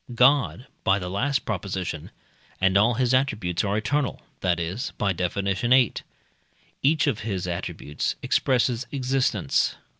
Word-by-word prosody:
God 130 0 +3 0.2
(by 95 0 +3
the 90 -2 -5
last 135 +8 0
Prop.) 105 -5 -2 1.0
and 95 0 +2
all 110 +4 +4
his 125 +1 +1
attributes 105 -10 +1
are 100 0 0
eternal, 135 +6 -1 0.2
that 90 -2 +1
is 90 +9 -3
(by 100 -2 +1
Def. 90 0 -2
viii.) 100 +6 +3 0.9
each 150 +2 +3
of 140 -8 0
his 100 -5 -3
attributes 80 -4 -3
expresses 125 -1 +1
existence. 130 - +1
110 Hz, 130 wpm, -25 LUFS, 95-130 Hz, 1.0 s, all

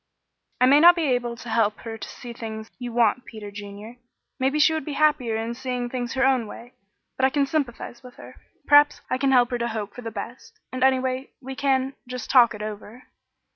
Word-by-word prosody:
"I 250 - +5
may 280 +3 +6
not 345 +3 +8
be 335 - -1
able 245 -4 0
to 245 - -11
help 220 -2 +1
her 225 -1 -6
to 225 - -8
see 240 -2 -9
things 220 -1 -7
you 245 -1 -5
want, 235 +1 +2
Peter 210 -3 -9
Junior. 205 +3 -9 0.4
Maybe 265 +3 +1
she 305 +1 +4
would 315 - -2
be 295 - -5
happier 280 -6 +2
in 225 +1 -3
seeing 250 -1 -4
things 245 -1 -4
her 265 0 +2
own 260 -4 +2
way; 240 +3 -11 0.4
but 260 - +3
I - - +4
can 280 +1 +1
sympathize 270 -5 -3
with 250 -1 -14
her. - - -13 0.3
Perhaps 290 0 +5
I 255 - 0
can 270 0 +2
help 250 -1 +4
her 245 - -1
to 235 - -1
hope 215 -3 -5
for 245 - -9
the 230 - -5
best, 225 +3 -9
and 255 0 -2
anyway 260 0 +1
we 265 0 -7
can 265 -1 0
just 250 -2 -5
talk 240 -4 +6
it 210 - -7
over." 215 +3 -8
245 Hz, 220 wpm, -24 LUFS, 230-265 Hz, 0.4 s, not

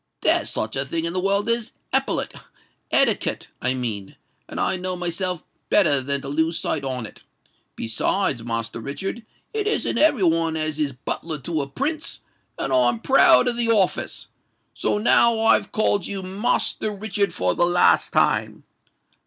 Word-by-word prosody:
There's - - +2
such 110 - -2
a 135 - +2
thing 160 +4 -3
in 170 - -2
the 185 - -1
world 200 +3 0
as 230 -1 -1 0.2
epaulette—etiquette, - - -1
I 130 +1 +3
mean; 110 -6 -4 0.3
and - - -6
I - - +1
know 185 0 -3
myself 180 0 -2 0.3
better 155 -10 +5
than 140 +1 -1
to 135 - -8
lose 160 +4 0
sight 145 - -2
on 130 -3 -3
it. - - -12 0.5
Besides, 120 - 0
Master 115 -1 -3
Richard—it 220 - -6
isn't 430 - 0
every 290 -9 +3
one 165 -1 +2
as 155 -1 -2
is 145 -2 0
butler 155 +5 -4
to 160 +2 -2
a 140 - -5
Prince; 305 - -3 0.4
and 135 - -2
I'm 120 -2 +3
proud 265 - +5
of 240 -1 0
the 235 -1 0
office. 205 -5 +1 0.5
So - - 0
now 230 +1 +4
I've 225 0 +3
called 205 -3 +1
you 195 -1 -5
Master 210 +2 -1
Richard 205 0 -1
for 90 0 0
the - - +1
last 175 0 +3
time. - - +1
170 Hz, 160 wpm, -22 LUFS, 135-210 Hz, 0.5 s, better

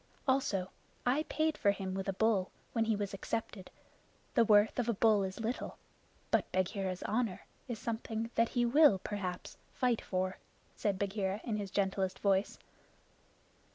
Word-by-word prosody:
"Also, 210 -9 +1 0.3
I 275 +5 +2
paid 315 +1 0
for 205 - +4
him 195 -2 -1
with 195 +1 -3
a - - 0
bull 200 -2 +2 0.2
when 225 -2 +2
he 220 -1 +2
was 200 -1 -3
accepted. 195 -1 -4 0.6
The 235 - +5
worth 210 +1 +4
of 240 -1 0
a 230 - +1
bull 215 0 +4
is 190 +1 -3
little, 230 +3 -3 0.5
but - - +2
Bagheera's 185 0 -1
honor 220 -3 -1 0.2
is 240 -3 -3
something 225 0 -3
that 230 0 +3
he 245 -1 +1
will 285 -3 +6
perhaps 185 -2 -5 0.2
fight 250 -3 +1
for," 185 0 -2 0.4
said 200 -2 0
Bagheera 195 0 -1
in 220 -3 -2
his 200 -2 -4
gentlest 190 -1 0
voice. 195 0 +1
205 Hz, 155 wpm, -33 LUFS, 190-230 Hz, 0.6 s, will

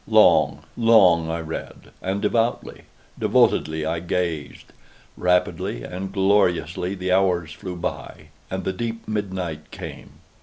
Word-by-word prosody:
Long, - - +4
long 95 -8 +5
I 85 0 -2
read—and 95 +4 -6
devoutly, 115 +2 -1 0.3
devotedly 80 0 +2
I 80 +1 -1
gazed. 85 -3 -3 0.4
Rapidly 90 -9 0
and 95 +2 -5
gloriously 95 -2 +1
the 90 -1 -2
hours 90 -4 +2
flew 90 +2 -7
by 85 - -6 0.2
and 95 0 -3
the 95 - -1
deep 115 +3 -5
midnight 95 -6 -4
came. - - -9
90 Hz, 115 wpm, -23 LUFS, 85-95 Hz, 0.4 s, long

